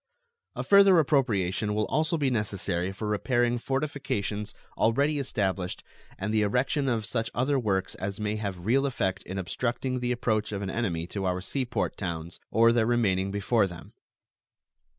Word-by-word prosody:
A - - -3
further 200 -2 +7
appropriation 110 - +1
will 105 0 +1
also 160 +2 0
be 140 -4 +1
necessary 100 -5 -1
for 100 +2 -5
repairing 120 +3 +1
fortifications 135 -7 -2 0.2
already 140 +6 +2
established 95 -8 -2 0.3
and 105 +3 -2
the 110 - +3
erection 125 +7 +1
of 115 -3 0
such 115 +2 -1
other 135 +3 +2
works 95 -5 0
as 100 +1 -5
may 105 0 -1
have 95 -4 -5
real 135 +5 +3
effect 110 -8 -1
in 95 - -5
obstructing 125 +7 -2
the 125 0 -1
approach 110 -3 0
of 100 -1 -3
an 95 - -3
enemy 90 -8 -1
to 95 +2 -4
our 90 0 0
sea 130 +8 -2
port 120 - -2
towns, 85 -3 -4
or 115 +1 +5
their 115 -1 +2
remaining 100 -6 +2
before 100 +1 +2
them. 85 -4 -11
110 Hz, 165 wpm, -28 LUFS, 95-125 Hz, 0.3 s, further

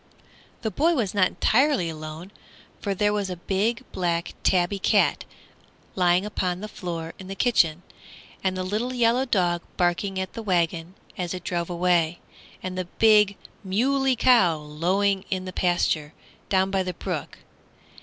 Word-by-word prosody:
The 220 - -1
boy 325 - +2
was 220 -9 -1
not 190 -3 +4
entirely 260 - +2
alone, 155 +3 -7 0.5
for 200 -2 -2
there 205 +2 +2
was 205 -2 -1
the 180 - -4
big 205 +7 -1
black 170 -2 -1
tabby 185 +2 +2
cat - - +2 0.7
lying 180 +1 +2
upon 185 -4 -2
the 210 - -6
floor 170 -5 -6
in 190 - -9
the 195 - -6
kitchen, 180 -8 +2 0.6
and 185 -1 0
the 185 - -2
little 220 +7 -2
yellow 240 +2 +3
dog 175 -6 +1 0.2
barking 185 +2 0
at 190 -1 -4
the 230 - -6
wagon 175 -3 -1 0.2
as 180 0 -2
it 180 - -7
drove 170 -1 -2
away, 175 -1 +1 0.4
and 185 0 -4
the 185 0 -2
big 210 +1 +4 0.3
moolie 260 +7 +1
cow 230 -10 +5
lowing 185 +6 0
in 185 -1 -2
the 185 - -6
pasture 170 -4 0 0.3
down 190 0 +2
by 195 -1 +1
the 180 -2 -4
brook. - - -5
185 Hz, 155 wpm, -25 LUFS, 175-210 Hz, 0.7 s, cow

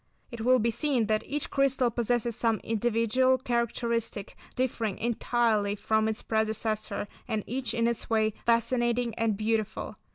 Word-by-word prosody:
It 235 -2 -6
will 255 +3 +5
be 235 0 +1
seen 260 -2 +1
that 215 0 +1
each 295 0 -3
crystal 270 -3 +2
possesses 235 0 0
some 225 -2 +1
individual 230 +3 +2
characteristic 235 -3 -2 0.2
differing 230 -5 -1
entirely 230 -3 +1
from 220 +1 +1
its 220 -1 -3
predecessor, 220 -1 -1 0.2
and 215 -2 -1
each, 255 +2 -2
in 230 0 +2
its 235 -1 -2
way, 220 -1 +2
fascinating 235 0 +1
and 220 -2 0
beautiful. 215 0 -2
230 Hz, 140 wpm, -28 LUFS, 220-240 Hz, 0.2 s, will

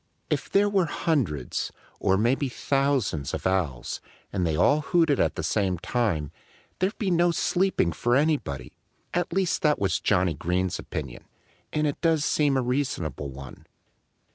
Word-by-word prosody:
If - - -1
there 200 +1 +4
were 195 -4 +2
hundreds 110 - -1 0.3
or 95 - +2
maybe 130 +6 +1
thousands 135 - 0
of - - -7
Owls, 90 -10 -1 0.3
and 90 -3 0
they 80 - 0
all 145 - +4
hooted 160 -3 +2
at - - +2
the - - -3
same 95 -4 +1
time, 85 - -1 0.5
there'd 190 +3 0
be 200 -4 0
no 175 0 +4
sleeping 175 - +1
for 120 +9 +1
anybody. 135 - 0 0.4
At 175 -1 0
least 185 0 0
that 150 -1 +3
was 95 -4 0
Johnnie 90 -4 +2
Green's 90 +4 -1
opinion. 70 -6 -6 0.5
And 150 0 0
it 145 - -2
does 160 -3 +2
seem 145 -3 +2
a 130 - +1
reasonable 120 - -2
one. 65 0 -11
125 Hz, 155 wpm, -26 LUFS, -, 0.5 s, there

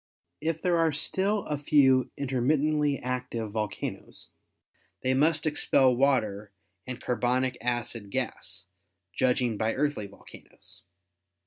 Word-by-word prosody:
If 160 0 -2
there 175 -2 +3
are 165 -1 +3
still 195 +7 0
a 150 -2 -2
few 135 -3 +4
intermittently 145 +2 +1
active 125 -4 -3
volcanoes 105 -1 -4 0.7
they 130 - +2
must 155 +4 +2
expel 135 -4 +3
water 110 -7 +1 0.4
and 125 -1 -5
carbonic 125 +2 0
acid 120 -3 -2
gas, 100 -7 -4 0.5
judging 125 -3 +1
by 110 +1 0
earthly 145 -7 -1
volcanoes. 100 -2 -12
130 Hz, 110 wpm, -28 LUFS, 120-150 Hz, 0.7 s, few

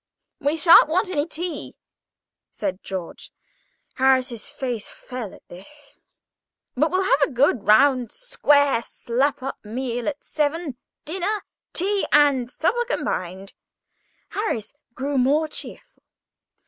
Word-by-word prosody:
"We 290 +3 0
shan't 330 -2 +7
want 365 +4 +1
any 295 -3 0
tea," 340 0 -5 0.7
said 195 -2 -4
George 185 -3 -7 0.6
(Harris's 260 -2 +2
face 250 -6 -4
fell 250 -6 -7
at - - -17
this); 280 +12 -13 0.8
"but - - +2
we'll 375 +1 +1
have 300 -6 +2
a 280 - +4
good 255 -4 +1
round, 250 +1 +5
square, 285 - +2
slap 255 +4 -1
up 270 - -5
meal 240 +2 -4
at 300 -1 -4
seven—dinner, 330 - -3 0.3
tea, 395 +3 0
and 280 -5 +4
supper 440 - 0
combined." 190 - -3 0.8
Harris 405 - -3 0.2
grew 275 +1 -1
more 290 +5 +3
cheerful. - - -8
280 Hz, 115 wpm, -23 LUFS, 240-320 Hz, 0.8 s, shan't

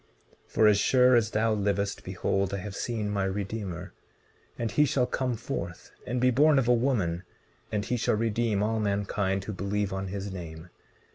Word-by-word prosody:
19:13 - - -29
For 110 - +6
as 105 -1 +5
sure 125 +3 +5
as 115 -2 +3
thou 110 0 +1
livest, 100 -1 -1
behold, 95 +1 -1
I - - -2
have 100 +1 -6
seen 110 -3 -2
my 100 -1 0
Redeemer; 95 -2 -4 0.6
and 115 -3 -2
he 150 - +4
shall 130 -3 +2
come 125 -1 -1
forth, 90 -7 -6 0.2
and 125 +2 -1
be 125 +1 +4
born 145 +4 +5
of 130 -3 +2
a 125 - +5
woman, 115 -9 +1 0.5
and 105 -1 -1
he 125 - -1
shall 110 - +1
redeem 110 -1 0
all 110 +1 0
mankind 100 -1 0
who 105 - -5
believe 100 +1 -2
on 95 0 -3
his 100 0 -5
name. 85 -2 -8
105 Hz, 190 wpm, -28 LUFS, 95-115 Hz, 0.6 s, For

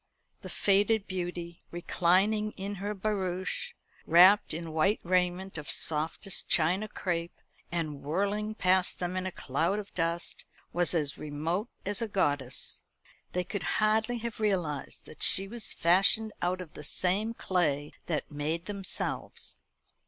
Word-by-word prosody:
The - - -8
faded 205 +1 +2
beauty, 175 -2 -5
reclining 190 +5 +2
in 200 +1 -5
her 205 +1 -2
barouche, 195 - -2 0.3
wrapped 185 +5 +7
in 160 0 -4
white 195 +7 +2
raiment 180 0 0
of 150 - -8
softest 160 +5 0
China 180 +6 +3
crape, 175 -5 -3 0.4
and 155 -4 -3
whirling 205 +7 -1
past 185 -2 +2
them 180 0 -3
in 185 0 -1
a - - -4
cloud 165 +7 -1
of 210 -1 -7
dust, 170 0 -2 0.3
was 175 0 +2
as 145 -4 0
remote 160 +9 -2 0.2
as 205 +2 -1
a 230 - 0
goddess. 145 - 0 0.5
They 180 - 0
could 195 +2 -4 0.2
hardly 220 +2 +2
have 235 -1 -5
realised 180 -9 -1
that - - -13
she 195 +1 +3
was 230 +1 +2
fashioned 195 +5 +4
out 180 +1 0
of 170 -4 -10
the 150 - -9
same 200 +9 0
clay 150 -8 0
that 155 -3 -2
made 155 +4 -2
themselves. 200 -2 -5
185 Hz, 140 wpm, -30 LUFS, 165-205 Hz, 0.5 s, wrapped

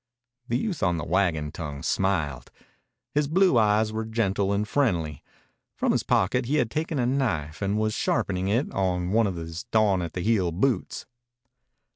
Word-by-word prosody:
The 120 - +1
youth 175 - -3
on 90 -2 +2
the 80 - -4
wagon 80 -4 0
tongue 75 -4 -6
smiled. 75 -11 -1 0.6
His 145 0 +1
blue 175 -4 +4
eyes 110 0 +2
were 110 +1 -2
gentle 100 -3 0
and 100 +1 0
friendly. 85 - 0 0.5
From - - +1
his - - +1
pocket 115 +7 +1
he 145 - +1
had 120 -7 +1
taken 155 0 -2
a 125 - +1
knife 105 - -1
and 100 +1 0
was 110 0 0
sharpening 95 -3 0
it 115 +8 0
on 90 -2 -1
one 110 +1 +3
of 95 - -3
his 85 0 -6
dawn 105 -4 +2
at 85 -2 -5
the 90 - -3
heel 100 -4 +1
boots. 110 +5 -1
100 Hz, 175 wpm, -26 LUFS, 90-115 Hz, 0.6 s, blue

